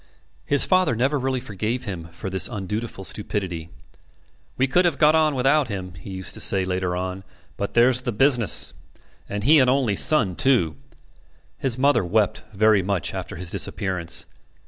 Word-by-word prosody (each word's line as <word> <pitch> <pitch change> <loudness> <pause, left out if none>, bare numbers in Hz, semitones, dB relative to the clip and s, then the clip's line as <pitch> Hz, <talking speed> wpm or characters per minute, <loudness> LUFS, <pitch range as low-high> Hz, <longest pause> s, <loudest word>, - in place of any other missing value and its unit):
His 145 - +5
father 185 -10 +2
never 135 +5 0
really 130 0 -2
forgave 115 +1 -4
him 90 -5 -6
for 95 +3 -7
this 95 -3 +2
undutiful 105 +1 -5
stupidity. 95 -5 -4 0.9
"We 130 - +2
could 155 +7 +2
have 175 - 0
got 150 0 +4
on 155 -2 +2
without 135 +2 +2
him," 95 -4 -6
he 85 +4 -12
used 95 -1 -5
to - - -5
say 95 -2 +4
later 90 -1 -2
on, 95 +1 -5 0.3
"but 100 - -5
there's 125 +1 +4
the 125 - -3
business. 120 0 +3 0.6
And 100 0 -4
he 150 +5 +5
an 130 -2 +3
only 130 -6 +1
son, 100 - +4
too!" 115 - +1 0.8
His 130 -3 -1
mother 140 -3 +2
wept 105 +4 0
very 110 0 +3
much 95 -3 -3
after - - -6
his 90 0 -3
disappearance. 90 -4 -2
105 Hz, 170 wpm, -22 LUFS, 95-130 Hz, 0.9 s, His